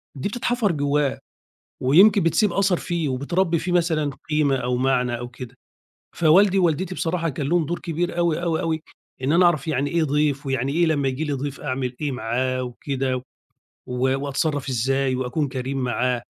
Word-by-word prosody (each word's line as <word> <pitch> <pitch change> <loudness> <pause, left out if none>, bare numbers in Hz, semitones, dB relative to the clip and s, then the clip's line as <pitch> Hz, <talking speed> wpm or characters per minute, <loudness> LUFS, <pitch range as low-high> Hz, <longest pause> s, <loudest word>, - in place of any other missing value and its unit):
دي 140 +9 -3
بتتحفر 240 -2 0
جوّاه، 145 -2 0 0.6
ويمكن 190 +9 +6
بتسيب 170 +4 +2
أثَر 195 -3 +2
فيه، 170 -4 -2
وبتربّي 170 +6 0
فيه 180 - -3
مثلًا 165 -4 +1 0.2
قيمة 150 -3 +2
أو 125 0 -1
معنى 125 -2 +1
أو 120 0 -6
كده. 125 0 -10 0.6
فوالدي 190 +4 +5
ووالدتي 180 +1 +1
بصراحة 165 -1 -1
كان 140 -1 -3
لهم 175 -2 +2
دور 175 +3 -2
كبير 175 0 -3
أوي، 170 -1 +1
أوي، 165 -2 0
أوي، 160 -1 -1 0.4
إن 135 +4 +1
أنا 180 +2 +5
أعرف 160 -3 +1
يعني 145 -1 0
إيه 170 -1 +1
ضَيف، 145 -1 0
ويعني 135 0 -1
إيه 170 +2 +2
لمّا 145 -4 +1
ييجي 135 +4 -2
لي 145 - -2
ضَيف 140 0 -4
أعمل 130 -3 -3
إيه 145 -3 -1
معاه 130 +2 -1
وكده، 130 +1 -3 0.7
و 130 +2 0
وأتصرف 145 0 -1
إزاي، 130 +2 0
وأكون 130 +4 -1
كريم 130 +1 -4
معاه. 125 -1 0
145 Hz, 170 wpm, -23 LUFS, 130-170 Hz, 0.7 s, ويمكن